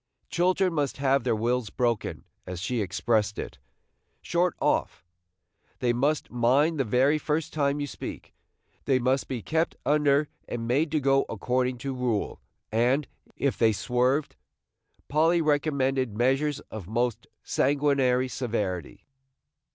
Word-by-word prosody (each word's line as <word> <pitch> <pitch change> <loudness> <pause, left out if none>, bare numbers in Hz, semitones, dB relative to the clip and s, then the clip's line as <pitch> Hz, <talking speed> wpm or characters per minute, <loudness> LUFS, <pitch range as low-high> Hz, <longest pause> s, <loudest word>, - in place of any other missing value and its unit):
Children 185 +1 +2
must 145 -4 -1
have 140 -1 +2
their 120 -2 +1
wills 120 +1 0
broken, 120 -1 -1 0.2
as 90 -1 -5
she 115 +5 -1
expressed 105 +2 0
it, - - -6 0.6
"short 175 0 +1
off"; - - 0 0.7
they 120 -1 +1
must 140 +5 0
mind 135 +7 +2
the - - +3
very 130 +6 +2
first 150 +1 -2
time 145 -1 +1
you 145 - -1
speak; 145 - -8 0.5
they 135 -2 +3
must 130 +2 +1
be 125 -5 -4
kept 160 +1 0
under 145 0 +3 0.2
and 115 -1 -4
made 145 +6 +1
to 155 - +3
go 135 0 +2
according 125 +3 -1
to 135 +3 -4
rule, 125 -5 -2 0.3
and, 125 +6 +2 0.3
if 140 -1 -1
they 115 -2 +5
swerved, 125 +6 0 0.7
Polly 160 +4 +3
recommended 135 -6 +1
measures 135 +4 +1
of 105 -6 -7
most 120 +2 -1 0.2
sanguinary 135 -2 +2
severity. 105 - -3
130 Hz, 135 wpm, -27 LUFS, 120-145 Hz, 0.7 s, they